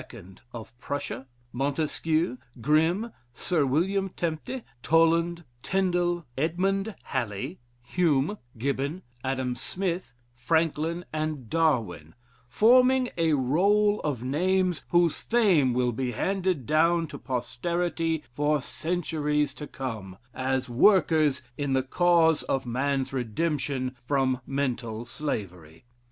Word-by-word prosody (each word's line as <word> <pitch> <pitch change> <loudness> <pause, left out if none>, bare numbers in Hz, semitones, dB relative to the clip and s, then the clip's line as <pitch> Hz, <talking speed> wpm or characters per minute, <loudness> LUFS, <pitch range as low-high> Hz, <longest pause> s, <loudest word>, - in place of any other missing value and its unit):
of 115 0 -9
Prussia, 135 -2 -4 0.3
Montesquieu, 150 +2 0 0.2
Grimm, 160 - +2 0.2
Sir 160 -6 +1
William 190 +8 +1
Tempte, 175 +9 -4 0.2
Toland, 165 +2 +3 0.2
Tindel, 175 -2 0
Edmund 195 +7 0
Halley, 120 - -3 0.2
Hume, 160 +5 +1 0.2
Gibbon, 140 +8 -2 0.2
Adam 130 -2 -1
Smith, 180 +7 -3 0.2
Franklin, 160 +5 0
and 155 -6 -3
Darwin, 110 - 0 0.3
forming 250 - +4
a 165 -2 +2
role 200 +10 +3
of 135 -6 -3
names, 180 +5 +1
whose 175 -2 +3
fame 190 - +3
will 125 0 +1
be 125 +1 -2
handed 185 - -1
down 165 +3 +3
to - - -9
posterity 165 +5 -2
for 145 +4 +1
centuries 150 -1 -1
to 150 - -8
come, 110 -8 -6 0.2
as 130 0 -1
workers 155 - +4 0.2
in 140 -2 0
the 130 0 +2
cause 165 +2 +3
of 135 -1 0
man's 130 +2 -1
redemption 130 +1 -1
from 130 -1 +1
mental 120 -5 -2
slavery. 95 - -5
150 Hz, 105 wpm, -27 LUFS, 130-175 Hz, 0.3 s, forming